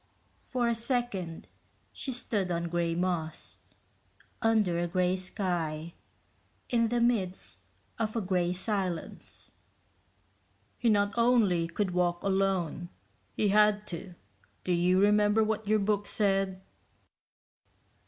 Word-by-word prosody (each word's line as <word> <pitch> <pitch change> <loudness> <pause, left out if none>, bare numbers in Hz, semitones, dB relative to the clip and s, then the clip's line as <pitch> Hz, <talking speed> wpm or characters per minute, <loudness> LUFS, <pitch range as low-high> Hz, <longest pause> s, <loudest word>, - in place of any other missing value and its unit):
For 245 -2 -1
a 235 - +2
second 230 -8 -2 0.5
she 270 - -5
stood 210 -6 -2
on 170 -1 -1
gray 170 -1 0
moss, 175 -3 -2 0.8
under 215 -7 +2
a 175 - 0
gray 180 +1 +1
sky, 170 -4 -3 0.8
in 230 -2 +3
the 240 +1 0
midst 220 -6 0 0.4
of 220 -1 -1
a 230 - +1
gray 180 -2 +1
silence. 185 -3 -3 1.3
"He 235 - +2
not 205 -1 +3
only 225 -8 +3
could 185 +3 -1
walk 175 -1 0
alone, 190 -3 0 0.5
he 210 - +2
had 210 0 +4
to. 175 +1 -7 0.5
Do 185 - -1
you 180 +2 +3
remember 210 +2 +4
what 215 -1 -2
your 215 +1 +4
book 205 0 0
said?" 195 -2 0
195 Hz, 115 wpm, -30 LUFS, 175-215 Hz, 1.3 s, had